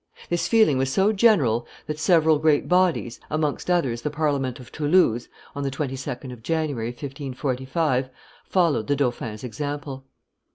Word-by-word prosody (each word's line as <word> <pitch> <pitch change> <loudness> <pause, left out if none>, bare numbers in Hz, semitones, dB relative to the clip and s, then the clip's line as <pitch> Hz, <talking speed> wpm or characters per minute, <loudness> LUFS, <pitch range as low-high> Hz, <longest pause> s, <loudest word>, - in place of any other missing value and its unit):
This 175 0 0
feeling 220 - +4
was 135 0 0
so 195 +8 +3
general 160 - +3 0.2
that 150 0 -5
several 160 -2 +4
great 155 -2 +2
bodies, 180 -9 +1
amongst 155 +1 -1
others 135 -10 +1
the 150 - -2
Parliament 140 -4 -1
of 125 -1 -13
Toulouse 150 -7 +2 0.3
(on 140 - -3
the 140 - -1
22d 135 -2 -4
of 120 - -12
January, 150 -5 -1
1545), 130 +1 -2 0.3
followed 165 - +1
the 145 - +2
dauphin's 120 -5 -2
example. 140 +2 -5
145 Hz, 140 wpm, -24 LUFS, 130-160 Hz, 0.3 s, feeling